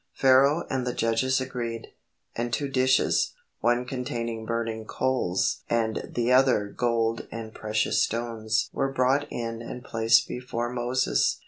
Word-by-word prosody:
Pharaoh 135 +4 +4
and 130 -1 -2
the 125 - -2
judges 115 +4 +1
agreed, 120 -3 -4 0.5
and 120 +1 -2
two 140 +4 -1
dishes, 130 - +2 0.2
one 120 +1 +1
containing 115 -3 -4
burning 115 -1 -2
coals 115 -8 0
and 115 -2 0
the 120 +1 +1
other 125 -6 +4
gold 115 0 0
and 110 -1 -7
precious 110 0 0
stones 110 -1 -1
were 135 0 0
brought 135 +2 +1
in 115 -1 -4
and 120 +1 -7
placed 115 0 +3
before 120 -1 -4
Moses. 125 +1 +1
120 Hz, 135 wpm, -26 LUFS, 115-130 Hz, 0.5 s, Pharaoh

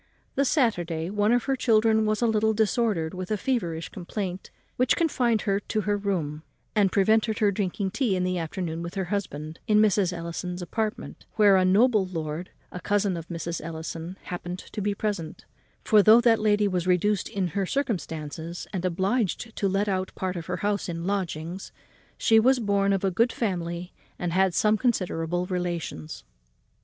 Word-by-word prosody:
The 275 - +1
Saturday, 175 - 0
one 210 +1 +2
of 245 0 +3
her 270 - 0
children 220 -3 +3
was 215 +2 0
a - - +4
little 220 -1 +2
disordered 210 -6 +1
with 185 0 -5
a 215 - 0
feverish 175 -10 -2
complaint 185 0 -5 0.3
which 255 0 +3
confined 245 -9 +1
her 195 -1 +1
to 215 +1 -2
her 205 0 0
room, 175 -7 -2 0.3
and 200 -3 +3
prevented 220 +2 +3
her 210 -3 +3
drinking 195 0 -2
tea 230 -4 +1
in 180 - 0
the 185 -1 0
afternoon 165 0 -4
with 170 +2 -6
her 195 - -1
husband 155 -5 -4
in 210 - +4
Mrs. 205 -3 +3
Ellison's 175 +1 -5
apartment, 215 +4 -4
where 205 -3 +6
a 185 - +4
noble 210 +3 +4
lord, 165 0 -4 0.2
a 180 - -6
cousin 200 +1 +1
of 165 -1 -6
Mrs. 170 -1 -4
Ellison's, 165 +2 -6
happened 180 0 -5
to 205 - -7
be 205 0 0
present; 200 -7 -4 0.4
for, 215 -2 +5
though 215 +3 +7
that 235 -2 +4
lady 210 -1 +3
was 185 -2 -1
reduced 185 +2 +2
in 190 -3 -1
her 195 +3 -2
circumstances 170 - -3
and 185 -2 -2
obliged 195 +5 -1
to 200 - 0
let 195 +2 0
out 190 -1 -2
part 185 -1 -3
of 170 -2 -6
her 180 0 -2
house 205 -2 0
in 170 0 -4
lodgings, 180 -2 -3 0.5
she 225 -1 +5
was 255 +4 +4
born 200 -3 +1
of 195 -1 0
a 195 - +2
good 230 +6 +2
family 175 -4 -3 0.2
and 175 -1 -2
had 190 -1 +2
some 215 0 +3
considerable 180 -7 0
relations. 170 - -4
190 Hz, 180 wpm, -26 LUFS, 175-215 Hz, 0.5 s, though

